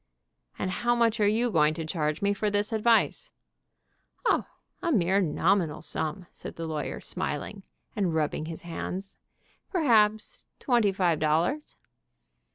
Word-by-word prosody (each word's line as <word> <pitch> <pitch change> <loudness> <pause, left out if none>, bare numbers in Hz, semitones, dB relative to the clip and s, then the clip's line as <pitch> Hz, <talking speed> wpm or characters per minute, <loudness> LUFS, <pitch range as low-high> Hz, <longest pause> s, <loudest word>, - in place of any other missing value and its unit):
"And 185 - -2
how 240 +4 +1
much 230 -2 +2
are 205 - +4
you 230 +3 +1
going 155 -3 +3
to 165 -1 -4
charge 155 0 -2
me 200 0 +3
for 210 +1 -1
this 205 +2 -1
advice?" 225 +1 +2 1.0
"O, - - +2 0.3
a 340 - 0
mere 195 - +3
nominal 170 -2 +1
sum," 160 +3 -2
said - - -9
the 165 - -5
lawyer, 155 -2 -3
smiling, 175 +7 -4 0.3
and 190 -6 0
rubbing 155 0 -1
his 165 -1 -6
hands. 185 +3 -5 0.5
"Perhaps 220 - +3
twenty 235 -7 +2
five 180 -4 +1
dol 155 +1 +3
lars." 295 - -3
195 Hz, 145 wpm, -28 LUFS, 160-220 Hz, 1.0 s, are